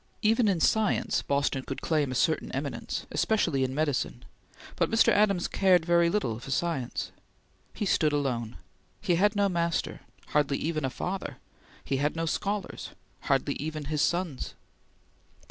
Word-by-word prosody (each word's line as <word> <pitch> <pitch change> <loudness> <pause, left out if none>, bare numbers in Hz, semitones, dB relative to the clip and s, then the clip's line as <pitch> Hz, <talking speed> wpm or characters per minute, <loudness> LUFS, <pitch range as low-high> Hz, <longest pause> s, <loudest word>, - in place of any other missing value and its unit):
Even 225 +1 +4
in 190 -4 +2
science 215 +4 +2
Boston 140 -1 0
could 135 +1 -6
claim 150 -5 +1
a - - -3
certain - - +1
eminence, - - -3
especially 170 -11 +1
in 130 0 -2
medicine, 145 -5 -1 0.5
but - - +1
Mr. 225 0 +4
Adams 200 -4 +3
cared 185 -4 +3
very 170 0 +4
little 125 - -1
for 130 - -10
science. 140 -3 -2 0.6
He 210 - -2
stood 155 -5 +3
alone. 125 -6 -1 0.4
He 195 -4 +1
had 205 +5 +3
no 200 0 +3
master 170 -2 -1 0.3
hardly 145 -2 +2
even 155 -2 -2
his 130 - -3
father. 190 +1 -4 0.5
He 135 - -1
had 145 +3 0
no 165 0 -1
scholars 200 +4 -3 0.4
hardly - - +1
even 155 0 -4
his 150 - +1
sons. 170 -6 -1
165 Hz, 150 wpm, -28 LUFS, 140-195 Hz, 0.6 s, Even